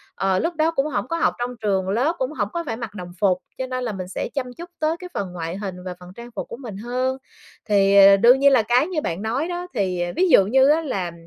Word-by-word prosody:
ờ, 190 Hz, -1 st, +1 dB
lúc 335 Hz, +1 st, -2 dB
đó 315 Hz, +1 st, +2 dB
cũng 275 Hz, -3 st, 0 dB
hổng 245 Hz, -5 st, -2 dB
có 335 Hz, -, -2 dB
học 335 Hz, -, +2 dB
trong 245 Hz, +1 st, -3 dB
trường 190 Hz, -3 st, 0 dB
lớp, 260 Hz, -, +1 dB
cũng -, -, -2 dB
hổng -, -, -2 dB
có 340 Hz, -, -2 dB
phải 225 Hz, -5 st, -4 dB
mặc 230 Hz, -3 st, -6 dB
đồng 180 Hz, -3 st, -7 dB
phục, 190 Hz, -3 st, +3 dB, 0.2 s
cho 260 Hz, -, -3 dB
nên 255 Hz, 0 st, -3 dB
là 240 Hz, -, -2 dB
mình 185 Hz, -3 st, -6 dB
sẽ 185 Hz, -, -4 dB
chăm 255 Hz, -3 st, -3 dB
chút 345 Hz, +4 st, -10 dB
tới 315 Hz, +1 st, +1 dB
cái 360 Hz, -1 st, -8 dB
phần 185 Hz, -3 st, -4 dB
ngoại 170 Hz, +1 st, -5 dB
hình 195 Hz, -3 st, -5 dB
và 180 Hz, -, -4 dB
phần 180 Hz, 0 st, -12 dB
trang 235 Hz, 0 st, -10 dB
phục -, -, -4 dB
của 235 Hz, -, -8 dB
mình 235 Hz, -7 st, -8 dB
hơn. 255 Hz, +4 st, -2 dB, 0.5 s
Thì, 200 Hz, -1 st, +4 dB
ờ, 195 Hz, 0 st, +8 dB
đương 240 Hz, +6 st, +6 dB
nhiên 280 Hz, 0 st, +5 dB
là 260 Hz, -4 st, +5 dB
cái 240 Hz, +7 st, +2 dB
như 350 Hz, -5 st, -2 dB
bạn 170 Hz, -, -3 dB
nói 240 Hz, +9 st, -1 dB
đó, 355 Hz, 0 st, -4 dB
thì, 185 Hz, -6 st, -1 dB
ờ, 175 Hz, 0 st, -2 dB
ví 370 Hz, +1 st, +2 dB
dụ 195 Hz, -, +6 dB
như 265 Hz, +6 st, +4 dB
á 310 Hz, +2 st, +4 dB
là 195 Hz, -, -3 dB
240 Hz, 280 wpm, -22 LUFS, 195-290 Hz, 0.5 s, ờ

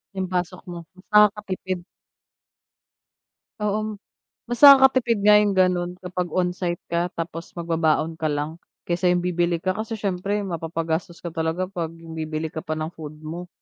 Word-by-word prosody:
Yung 190 Hz, -1 st, -1 dB
pasok 180 Hz, 0 st, -2 dB
mo 175 Hz, -1 st, -7 dB
mas 185 Hz, +1 st, -19 dB
nakakapipid. 195 Hz, -4 st, +2 dB, 1.7 s
Oo, 210 Hz, 0 st, -2 dB, 0.5 s
mas 240 Hz, +4 st, -3 dB
nakakatipid 265 Hz, -5 st, +8 dB
nga 210 Hz, +1 st, +6 dB
yung 210 Hz, -1 st, +4 dB
ganun 180 Hz, -2 st, +2 dB
kapag 180 Hz, -2 st, -4 dB
onsite 180 Hz, -1 st, -1 dB
ka 170 Hz, +1 st, -1 dB
tapos 165 Hz, 0 st, -6 dB
mag-babaon 165 Hz, -1 st, +1 dB
ka 155 Hz, -2 st, -1 dB
lang 150 Hz, +2 st, -2 dB, 0.3 s
kaysa 180 Hz, +1 st, +2 dB
yung 180 Hz, -, +2 dB
bibili 175 Hz, -1 st, +1 dB
ka 185 Hz, +1 st, -1 dB
kasi 220 Hz, 0 st, -4 dB
siyempre 200 Hz, +1 st, -1 dB
mapapa-gastos 165 Hz, 0 st, -3 dB
ka 175 Hz, -, -7 dB
talaga 165 Hz, +2 st, -2 dB
pag 170 Hz, -4 st, -4 dB
bibili 160 Hz, -1 st, -5 dB
ka 160 Hz, 0 st, -7 dB
pa -, -, -6 dB
ng 155 Hz, -, -2 dB
food 150 Hz, -1 st, -9 dB
mo. 170 Hz, +3 st, -7 dB
175 Hz, 150 wpm, -24 LUFS, 165-195 Hz, 1.7 s, nakakatipid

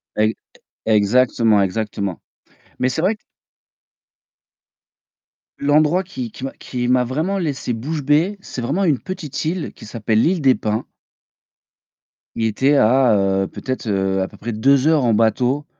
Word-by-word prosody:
Ex 110 Hz, +1 st, +2 dB, 0.5 s
exactement, 110 Hz, 0 st, +3 dB
exactement 100 Hz, -1 st, -3 dB, 0.6 s
mais 130 Hz, -, +1 dB
c'est 130 Hz, -, -2 dB
vrai 195 Hz, +6 st, +1 dB
q -, -, -40 dB, 2.4 s
L'endroit 150 Hz, +5 st, +2 dB
qui 130 Hz, -, -6 dB
qui -, -, -11 dB
m'a 135 Hz, -, -3 dB
qui 125 Hz, -1 st, -3 dB
m'a 125 Hz, 0 st, +3 dB
vraiment 155 Hz, +11 st, -1 dB
laissé 150 Hz, -9 st, -2 dB
bouche 145 Hz, +7 st, -3 dB
bée, 155 Hz, +9 st, +2 dB
c'est 130 Hz, -, -7 dB
vraiment 145 Hz, +11 st, -1 dB
une 150 Hz, -8 st, +2 dB
petite 180 Hz, -8 st, -5 dB
île 170 Hz, +1 st, -2 dB
qui -, -, -13 dB
s'appelle 110 Hz, 0 st, 0 dB
l'île 175 Hz, +3 st, +1 dB
des 135 Hz, -2 st, +5 dB
Pins. 110 Hz, 0 st, -2 dB, 1.5 s
Il 115 Hz, -, -1 dB
était 130 Hz, +7 st, +2 dB
à, 125 Hz, -1 st, +4 dB
heu, 95 Hz, 0 st, +1 dB
peut-être, 130 Hz, +2 st, -5 dB
heu, 95 Hz, -1 st, 0 dB
à 95 Hz, -, -1 dB
peu 105 Hz, -, -16 dB
près 120 Hz, -, -5 dB
2 135 Hz, +6 st, +3 dB
heures 155 Hz, -5 st, +3 dB
en 115 Hz, -, +3 dB
bateau 125 Hz, +6 st, +1 dB
125 Hz, 150 wpm, -20 LUFS, 110-150 Hz, 2.4 s, des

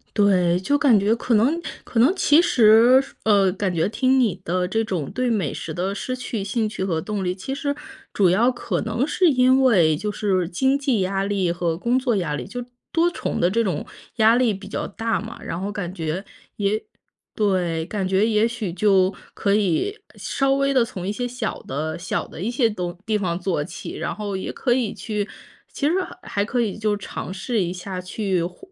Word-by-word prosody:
对， 185 Hz, -4 st, +3 dB
就 285 Hz, +10 st, +2 dB
感 275 Hz, -6 st, +5 dB
觉 205 Hz, +2 st, +2 dB
可 235 Hz, +1 st, -1 dB
能 265 Hz, +10 st, +3 dB, 0.2 s
可 230 Hz, -, -2 dB
能 275 Hz, +11 st, +5 dB
其 310 Hz, -4 st, +5 dB
实 240 Hz, -3 st, +6 dB, 0.2 s
呃， 200 Hz, -3 st, +4 dB
感 190 Hz, -1 st, -2 dB
觉 165 Hz, +4 st, +1 dB
听 260 Hz, +4 st, +2 dB
你 215 Hz, -8 st, +2 dB
的 180 Hz, +1 st, 0 dB
这 225 Hz, +5 st, 0 dB
种 180 Hz, -10 st, -3 dB
对 255 Hz, 0 st, -1 dB
美 195 Hz, -, 0 dB
食 160 Hz, -, -6 dB
的 185 Hz, +4 st, -2 dB
失 255 Hz, +5 st, -3 dB
去 245 Hz, -4 st, -4 dB
兴 215 Hz, +3 st, -1 dB
趣 200 Hz, -3 st, -3 dB
和 165 Hz, -4 st, -1 dB
动 210 Hz, +3 st, -3 dB
力， 180 Hz, -1 st, -1 dB
其 195 Hz, +8 st, -5 dB
实， 285 Hz, 0 st, -2 dB, 0.4 s
主 195 Hz, -3 st, +4 dB
要 220 Hz, +8 st, +4 dB
可 245 Hz, -, -2 dB
能 230 Hz, +4 st, 0 dB
是 360 Hz, +4 st, +2 dB
因 260 Hz, -1 st, +4 dB
为 175 Hz, -, +4 dB
就 210 Hz, +6 st, -3 dB
是 190 Hz, -4 st, 0 dB
经 265 Hz, +10 st, +1 dB
济 265 Hz, -7 st, +1 dB
压 195 Hz, +1 st, 0 dB
力 195 Hz, -3 st, 0 dB
和 170 Hz, -1 st, -1 dB
工 240 Hz, +7 st, +1 dB
作 250 Hz, -3 st, 0 dB
压 170 Hz, -6 st, -1 dB
力， 135 Hz, -4 st, -4 dB
就 245 Hz, 0 st, -5 dB, 0.3 s
多 340 Hz, +1 st, +3 dB
重 -, -, -3 dB
的 175 Hz, -, +3 dB
这 230 Hz, +3 st, +2 dB
种 195 Hz, -6 st, -2 dB, 0.3 s
压 225 Hz, 0 st, +5 dB
力 245 Hz, -4 st, +3 dB
比 195 Hz, 0 st, -9 dB
较 -, -, -3 dB
大 225 Hz, -1 st, -2 dB
嘛。 220 Hz, +4 st, -8 dB
然 165 Hz, -, -4 dB
后 195 Hz, -, -2 dB
感 200 Hz, -4 st, -4 dB
觉 165 Hz, +1 st, -3 dB, 0.3 s
也 205 Hz, +1 st, 0 dB, 0.5 s
对， 180 Hz, -6 st, 0 dB
感 195 Hz, +1 st, -2 dB
觉 190 Hz, +2 st, +3 dB
也 220 Hz, 0 st, +3 dB
许 230 Hz, -6 st, -4 dB
就 190 Hz, +1 st, +3 dB, 0.2 s
可 200 Hz, -2 st, 0 dB
以， 210 Hz, -, +1 dB, 0.2 s
稍 270 Hz, 0 st, 0 dB
微 275 Hz, 0 st, +1 dB
地 255 Hz, -3 st, +4 dB
从 190 Hz, -7 st, -7 dB
一 195 Hz, -, -1 dB
些 245 Hz, +4 st, -3 dB
小 245 Hz, -2 st, -4 dB
的 155 Hz, +5 st, -3 dB
小 185 Hz, -, -2 dB
的 -, -, -11 dB
一 205 Hz, -, -1 dB
些 240 Hz, -1 st, +2 dB
东 180 Hz, -4 st, -4 dB
地 220 Hz, -1 st, +1 dB
方 180 Hz, -4 st, -1 dB
做 180 Hz, -3 st, -1 dB
起。 170 Hz, -, -8 dB
然 -, -, -3 dB
后 205 Hz, -2 st, -3 dB
也 190 Hz, -, -5 dB
可 250 Hz, -, -1 dB
以 240 Hz, -5 st, 0 dB
去 210 Hz, -2 st, -3 dB, 0.5 s
其 -, -, -2 dB
实 -, -, +1 dB, 0.3 s
还 200 Hz, 0 st, -1 dB
可 245 Hz, +2 st, 0 dB
以 215 Hz, -4 st, -2 dB
就 215 Hz, -1 st, 0 dB
尝 190 Hz, -2 st, -6 dB
试 215 Hz, +3 st, -1 dB
一 175 Hz, -1 st, -1 dB
下 185 Hz, +1 st, -6 dB
去 185 Hz, 0 st, -1 dB
缓 175 Hz, +2 st, -4 dB
205 Hz, 230 characters per minute, -23 LUFS, 185-240 Hz, 0.5 s, 实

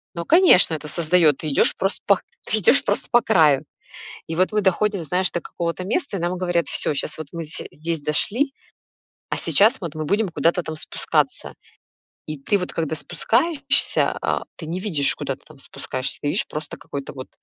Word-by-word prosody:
Ну, 170 Hz, 0 st, -4 dB
конечно, 330 Hz, -, +6 dB
это 150 Hz, 0 st, -7 dB
создаёт 160 Hz, -2 st, +3 dB
ты -, -, -2 dB
идёшь -, -, +5 dB
просто 195 Hz, +1 st, -1 dB
пох 200 Hz, -2 st, +4 dB, 0.3 s
ф -, -, +2 dB
идешь 215 Hz, +7 st, +5 dB
просто -, -, -1 dB
по 240 Hz, -1 st, +5 dB
краю. 155 Hz, -, +4 dB, 0.7 s
И -, -, -3 dB
вот 185 Hz, +4 st, +2 dB
мы 210 Hz, -, +2 dB
доходим, 195 Hz, 0 st, +1 dB
знаешь, 180 Hz, +5 st, 0 dB
до 175 Hz, -, -2 dB
какого-то 170 Hz, +2 st, -4 dB
места, 225 Hz, -, -2 dB
и -, -, -4 dB
нам 175 Hz, +1 st, -1 dB
говорят: 175 Hz, -2 st, 0 dB
"Всё, 150 Hz, -, 0 dB
щас 150 Hz, +2 st, -3 dB
вот 155 Hz, -3 st, -7 dB
мы 165 Hz, -1 st, -5 dB
все 155 Hz, -, -4 dB
здесь 165 Hz, +1 st, -4 dB
дошли, 210 Hz, -, +1 dB, 0.8 s
а -, -, -2 dB
сейчас 220 Hz, +6 st, +4 dB
вот 170 Hz, -5 st, -6 dB
мы 155 Hz, -, -4 dB
будем 200 Hz, +6 st, +1 dB
куда-то 165 Hz, +3 st, +1 dB
там 160 Hz, -, -6 dB
спускаться". -, -, -2 dB, 0.8 s
И 155 Hz, -, -5 dB
ты 200 Hz, +9 st, 0 dB
вот 180 Hz, -, -5 dB
когда 160 Hz, -1 st, -2 dB
спускаешься, 245 Hz, -, 0 dB
а -, -, 0 dB, 0.2 s
ты 160 Hz, -, -8 dB
не 175 Hz, +3 st, -4 dB
видишь, 155 Hz, -9 st, +1 dB
куда -, -, -4 dB
ты -, -, -23 dB
там 155 Hz, -2 st, -16 dB
спускаешься, 130 Hz, -1 st, -4 dB
ты 145 Hz, -, -1 dB
видишь, -, -, +1 dB
просто 150 Hz, -1 st, -6 dB
какой-то 140 Hz, -1 st, -7 dB
вот 130 Hz, -1 st, -9 dB
170 Hz, 195 wpm, -22 LUFS, 155-200 Hz, 0.8 s, конечно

